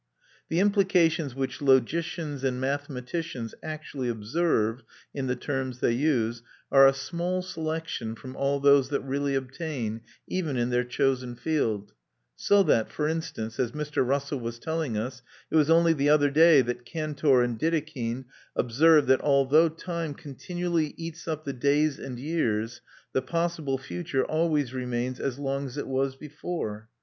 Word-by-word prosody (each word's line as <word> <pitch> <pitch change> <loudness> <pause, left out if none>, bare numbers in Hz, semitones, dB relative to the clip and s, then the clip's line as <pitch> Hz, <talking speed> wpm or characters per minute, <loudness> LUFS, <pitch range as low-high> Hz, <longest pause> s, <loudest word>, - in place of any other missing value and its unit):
The 165 - +1
implications 180 - +3
which 135 +1 -3
logicians 145 +2 +1
and 130 -2 0
mathematicians 135 -1 -3
actually 150 -5 -4
observe 115 0 0 0.3
in 135 -2 -3
the 125 - 0
terms 130 0 -3
they 125 - +2
use 120 -3 +1 0.3
are 135 0 +8
a - - +6
small 175 +6 -2
selection 160 -9 -4
from 130 +3 -10
all 140 +1 0
those 140 -1 +5
that 145 - -1
really 140 +1 -1
obtain, 130 -4 -3 0.3
even 160 -8 -2
in 120 +1 0
their 125 0 +2
chosen 125 0 0
field; 110 -9 -1 0.4
so 200 - +4
that, 115 - +2
for 150 - -1
instance, 155 -9 -4
as 125 -2 0
Mr. 150 -2 -1
Russell 140 +2 -1
was 115 0 -5
telling 160 -4 -2
us, 125 +3 -4 0.3
it - - 0
was 155 -1 +4
only 165 0 +5
the 145 -1 +1
other 145 -1 +4
day 155 -2 +7
that 120 0 -4
Cantor 145 -2 +1
and 120 -2 -2
Dedekind 145 -7 -1 0.3
observed 145 +4 +4
that 130 0 +4
although 145 +3 +4
time 165 -2 -4
continually 165 +2 -3
eats 165 0 -7
up 155 -1 -3
the 140 - -3
days 140 +3 +2
and 130 -2 -6
years, 120 -7 -1 0.3
the 130 - +2
possible 165 -1 -1
future 130 +2 -2
always 155 -5 0
remains 125 0 -2
as 135 -2 -2
long 140 0 -2
as 130 +2 -9
it 145 - -3
was 135 0 -1
before. 135 -7 -5
140 Hz, 155 wpm, -27 LUFS, 125-160 Hz, 0.4 s, are